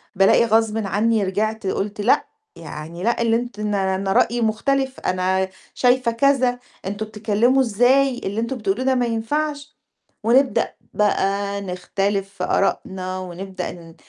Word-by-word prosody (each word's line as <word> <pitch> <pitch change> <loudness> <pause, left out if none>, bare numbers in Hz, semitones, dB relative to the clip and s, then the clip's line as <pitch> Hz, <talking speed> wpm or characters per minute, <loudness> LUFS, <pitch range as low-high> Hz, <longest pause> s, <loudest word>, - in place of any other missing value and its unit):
بالاقي 195 +4 +5
غصبٍ 225 -1 +2
عني 215 +3 +1
رجعت 215 +2 -1
قُلت 205 +2 -2
لأ، 225 - +3 0.3
يعني 165 +3 -8
لأ، 235 +2 +1
اللي 230 -1 +3
أنت 240 -2 -3
أن 210 0 -1
أنا 195 0 0
رأيي 240 +4 +2
مختلف، 265 +5 0
أنا 185 +1 0 0.2
شايفة 250 -1 +2
كذا، 255 0 +2 0.3
أنتم 205 +3 -3
بتتكلموا 220 +4 +2
إزاي؟ 250 +3 +3
اللي 200 +3 -2
أنتم 235 +3 -3
بتقولوه 215 +3 -1
ده 265 0 +3
ما 250 -1 +1
ينفعش. 285 +6 -2 0.5
ونبدأ 255 +4 +3 0.2
بقى 200 -1 0
نختلف 195 +1 -2
في 195 - -7
آراءنا 185 -1 -1
ونبدأ 185 +1 -6
ن 165 -2 -13
215 Hz, 140 wpm, -21 LUFS, 195-245 Hz, 0.5 s, بالاقي